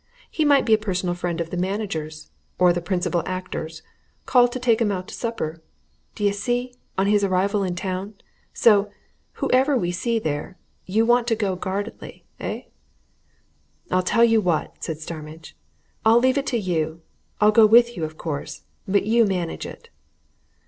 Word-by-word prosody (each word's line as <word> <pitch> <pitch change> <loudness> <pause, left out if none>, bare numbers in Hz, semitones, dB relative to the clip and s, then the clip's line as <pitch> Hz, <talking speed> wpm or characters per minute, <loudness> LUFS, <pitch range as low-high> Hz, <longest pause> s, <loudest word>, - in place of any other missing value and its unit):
He 315 - 0
might 285 -2 +4
be 225 - +3
a 215 - +5
personal 185 -4 -1
friend 175 -1 -3
of 165 -1 -3
the 180 - -3
manager's, 175 -5 -4 0.3
or 180 -1 +5
the 175 - -2
principal 175 -1 -1
actor's 165 -3 -5 0.4
called 245 -1 +4
to 255 - -3
take 240 -2 +2
'em 210 -3 +2
out 185 -1 -4
to - - -9
supper, 165 -9 -4 0.5
d'ye 205 -1 +1
see, 245 +4 -2 0.2
on 190 - +2
his 205 0 +3
arrival 200 +2 +1
in 185 -2 -2
town. 190 +3 -4 0.4
So 205 -3 +4 0.4
whoever 265 +2 +2
we 175 -6 -1
see 230 +6 -1
there, 155 -2 -3 0.3
you 215 +4 +2
want 240 0 +3
to 230 - +2
go 200 -4 -1
guardedly, 190 +2 -5
eh?" - - -4 1.3
"I'll 185 - +3
tell 230 +6 +2
you 225 -1 +3
what," 175 -5 -2
said 160 - -3
Starmidge, 155 0 -9 0.5
"I'll 225 +1 +6
leave 260 +3 +3
it 275 - -5
to 245 - 0
you. 165 -5 -2 0.4
I'll 210 0 +5
go 215 0 +7
with 235 +2 +5
you, 165 - -4
of 155 0 -5
course, 150 -5 -5 0.2
but 200 +1 +2
you 230 +2 +4
manage 180 -5 -2
it." 465 - -12
195 Hz, 170 wpm, -23 LUFS, 175-230 Hz, 1.3 s, go